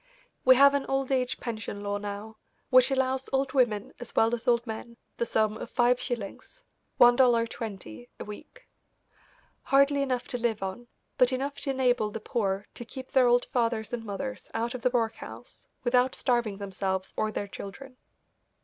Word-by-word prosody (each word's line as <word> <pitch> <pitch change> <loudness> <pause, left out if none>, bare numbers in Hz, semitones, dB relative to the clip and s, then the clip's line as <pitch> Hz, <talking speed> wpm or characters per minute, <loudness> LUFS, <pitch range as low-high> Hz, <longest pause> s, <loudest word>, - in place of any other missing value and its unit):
We 260 0 +7
have 280 +2 +7
an 280 -1 -1
old 270 0 -1
age 255 -1 0
pension 215 -3 -5
law 205 0 -2
now, 205 +2 -6 0.3
which 255 0 +7
allows 265 0 0
old 270 0 0
women 220 -6 +1
as 245 - -9
well 225 +1 +4
as 235 -1 -3
old 235 0 +3
men 235 +1 -7 0.2
the 235 - -1
sum 215 -1 +1
of - - -7
five 245 0 +3
shillings 245 - -6 0.3
$1.20 230 - +2
a - - -6
week; 210 0 -11 0.9
hardly 280 +1 +3
enough 255 -3 -1
to 245 - -2
live 225 -4 -1
on, 195 +6 -5 0.3
but 250 0 +5
enough 270 +2 -2
to 280 - -4
enable 250 -5 +2
the 225 - -6
poor 200 -3 -1
to - - -6
keep 260 +2 -9
their 255 -2 +5
old 245 0 +4
fathers 230 -2 -1
and 235 -2 -3
mothers 240 +5 -5
out 230 +2 -1
of 255 - -6
the 250 - +3
workhouse 230 -3 -4 0.2
without 250 +1 +3
starving 235 -5 0
themselves 190 -1 -3
or 215 - 0
their 205 - -3
children. 255 +7 -9
240 Hz, 170 wpm, -28 LUFS, 215-255 Hz, 0.9 s, We